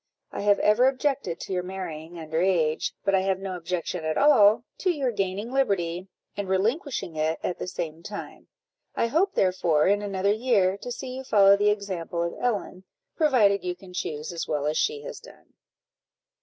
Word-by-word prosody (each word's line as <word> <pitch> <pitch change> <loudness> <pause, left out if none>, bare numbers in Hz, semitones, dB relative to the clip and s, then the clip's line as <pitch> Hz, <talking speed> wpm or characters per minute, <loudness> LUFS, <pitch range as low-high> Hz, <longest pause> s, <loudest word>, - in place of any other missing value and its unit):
I - - -5
have 205 0 +4
ever 215 +5 +4
objected 265 - -1
to - - -5
your 180 - 0
marrying 175 -3 -7
under 160 0 -2
age, 165 -5 +1
but 195 - +2
I 190 - +5
have 190 0 0
no 190 -1 -5
objection 175 0 -3
at 155 0 -1
all 230 -6 +5 0.2
to 375 - +1
your 280 -7 0
gaining 200 +2 -2
liberty, 190 -9 0 0.3
and 200 -2 -4
relinquishing 220 - -1
it 155 +1 0
at 180 - -2
the - - -4
same 165 -2 -5
time. 205 +4 -8 0.5
I - - +1
hope, 335 +11 +1
therefore, 175 -5 +2
in 205 +2 +3
another 200 0 0
year, 210 -5 +2
to 245 - -6
see 255 +1 -6
you 265 - -6
follow 200 -5 +6
the 205 +1 +2
example 185 -5 -2
of 170 - -4
Ellen, 205 -6 -2 0.3
provided 220 - +3
you 180 -1 -2
can 180 0 -14
choose 155 -2 -4
as 170 - -4
well 150 -2 -1
as 150 +1 0
she 445 - 0
has - - -7
done." - - -17
195 Hz, 185 wpm, -26 LUFS, 175-230 Hz, 0.5 s, follow